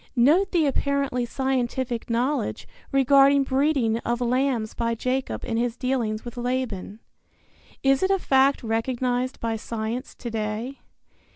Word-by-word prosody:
Note 300 +11 +4
the 335 -4 +3
apparently 280 -3 0
scientific 255 -2 -2
knowledge 250 +5 -1 0.2
regarding 275 +1 +5
breeding 265 -4 +1
of 240 0 -2
lambs 245 -2 0
by 230 0 -1
Jacob 255 +3 -2
in 225 - -2
his 235 0 -1
dealings 245 -5 -1
with 240 0 -8
Laban. 240 -5 -3 0.8
Is 270 0 +3
it 380 - +2
a 390 - +3
fact 275 -5 +3
recognized 245 +3 -1
by 225 -1 -2
science 230 +3 -4
to 235 - -6
day? 220 +4 -3
250 Hz, 130 wpm, -25 LUFS, 230-270 Hz, 0.8 s, regarding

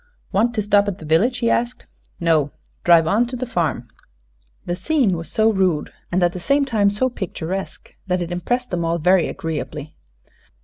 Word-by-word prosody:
"Want 235 +5 +1
to 215 - 0
stop 205 0 +3
at 195 -2 -2
the 160 - -10
village?" 200 +12 +2
he 235 -2 +1
asked. 240 +1 -1 0.3
"No; 160 -4 +2 0.3
drive 170 -2 +6
on 215 +9 +2
to 250 - -5
the 255 +1 -3
farm." 160 - -1 0.8
The 175 - -2
scene 255 - +1
was 165 0 -6
so 220 -1 +3
rude 185 -7 0 0.2
and 180 0 +2
at 175 0 +2
the 180 - -5
same 280 +9 +2
time 215 -6 +2
so 210 +6 +1
picturesque 190 -4 -5
that 180 0 +1
it 175 0 -4
impressed 245 +9 -2
them 175 -2 -1
all 165 +1 0
very 180 +2 +3
agreeably. 155 -1 -5
185 Hz, 185 wpm, -21 LUFS, 165-230 Hz, 0.8 s, drive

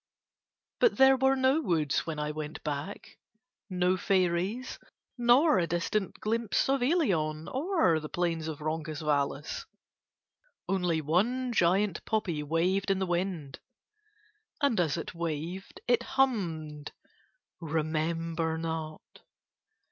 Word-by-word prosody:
But 485 - +4
there 265 0 +7
were 265 +1 +3
no 265 +4 +3
woods 160 - 0
when 160 -2 -3
I 150 0 -2
went 155 0 -6
back, 150 +6 -5 0.5
no 180 0 +1
fairies 185 +6 0 0.4
nor 245 - +4
distant 175 +4 -1
glimpse 225 0 0
of 270 -1 +2
Ilion 180 - +1
or 275 - +2
plains 165 -2 -1
of 155 -2 -5
Roncesvalles, 155 - -2 1.0
only 180 -4 +1
one 235 - +1
giant 195 0 +2
poppy 195 -8 -1
waved 175 +6 0
in 195 - +3
the 190 - 0
wind, 175 -5 -2 1.0
and 280 -8 +2
as 165 -3 +1
it 165 - -5
waved 170 +3 -5
it 245 -1 +3
hummed 165 - -1 0.7
"Remember 160 +1 -1
not." 160 -1 -4
175 Hz, 110 wpm, -29 LUFS, 155-220 Hz, 1.0 s, there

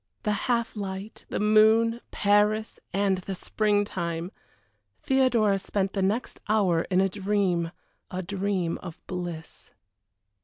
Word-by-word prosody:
The 210 - +1 0.2
half 235 -2 +1
light, 195 +1 -6
the - - -2
moon, 220 +2 +4
Paris, 210 +2 +2
and 195 -1 +1
the 190 +1 -5
spring 205 +2 +1
time! 170 -2 -3 0.7
Theodora 240 -7 +3
spent 195 0 -2
the 195 - -1
next 205 +6 -1
hour 190 -6 +2
in 185 -1 +3
a 195 - +3
dream 190 -3 0 0.4
a 185 +1 -4
dream 190 -2 -1
of 170 -3 -9
bliss. 175 -3 -6
200 Hz, 125 wpm, -27 LUFS, 185-215 Hz, 0.7 s, moon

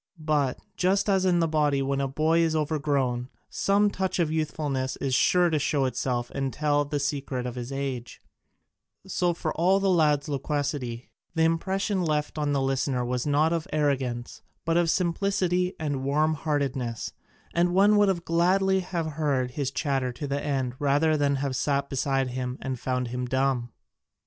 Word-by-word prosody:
But, 150 -4 0 0.2
just 195 +3 +2
as 190 -1 +2
in 175 -2 +3
the 165 - +2
body 150 -3 +1
when 140 0 0
a 135 - 0
boy 155 +4 +2
is 165 -1 +2
overgrown, 140 -5 0 0.2
some 205 +1 +2
touch 190 -1 -2
of 165 -4 +1
youthfulness 145 -4 -2
is 135 -2 -2
sure 175 +5 +4
to 155 - +2
show 145 -1 +1
itself 125 -2 -2
and 135 -1 -2
tell 145 0 +1
the 145 0 -3
secret 140 -3 -2
of 125 - -3
his 125 +1 -6
age, 135 -4 -4 0.9
so 180 -2 0
for 160 -2 -3
all 185 +4 +3
the 195 -1 +2
lad's 150 -5 +3
loquacity, 140 -4 -3 0.2
the 160 - +3
impression 190 +4 0
left 150 -1 -1
on 145 -1 0
the 140 -1 +1
listener 135 -1 0
was 125 +2 -2
not 150 +3 +3
of 165 +1 -2
arrogance, 130 -5 -1 0.2
but 165 0 +1
of 170 -1 +3
simplicity 180 0 +1
and 145 -4 -2
warm 150 +3 +2
heartedness, 140 -6 -2 0.4
and 175 +1 +2
one 205 +2 +5
would 195 -4 +2
gladly 190 +3 +3
have 180 -3 -3
heard 145 -5 -1
his 140 0 -2
chatter 135 -2 -1
to 135 +4 -6
the 140 0 -2
end 135 -4 -1
rather 145 +2 +3
than 145 -1 +2
have 135 -1 -2
sat 140 0 0
beside 135 -1 0
him 125 0 -4
and 130 -2 -4
found 125 -1 -2
him 125 +1 -3
dumb. 130 -2 0
145 Hz, 175 wpm, -26 LUFS, 135-165 Hz, 0.9 s, one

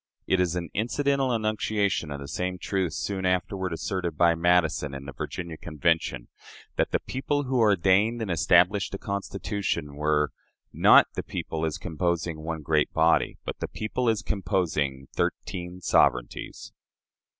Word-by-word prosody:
It 95 - +2
is 90 -2 +1
an 85 -1 -4
incidental 135 +4 +1
enunciation 110 -5 0
of 70 -1 -5
the 70 - -7
same 90 +4 -3
truth 95 -3 -1
soon 95 +4 -3
afterward 90 0 0
asserted 90 +1 -3
by 85 -1 +5
Madison 80 -4 +2
in 70 0 -7
the 70 - -6
Virginia 85 -3 -5
Convention 80 -6 -1 0.5
that - - +1
the - - +1
people 145 +2 -2
who 130 -1 0
ordained 105 +2 +3
and 110 -5 -2
established 90 +4 +3
the - - -2
Constitution 100 -6 -3
were 75 0 +1 0.4
"not - - +7
the - - -3
people 80 0 -3
as 80 - -3
composing 85 -1 -2
one 80 0 -5
great 75 -1 +2
body, 80 +1 +3
but - - -5
the - - -3
people 115 +3 -2
as 110 -3 0
composing 80 -10 -1
thirteen 90 0 -3
sovereignties". 60 -6 +1
90 Hz, 150 wpm, -26 LUFS, 80-100 Hz, 0.5 s, not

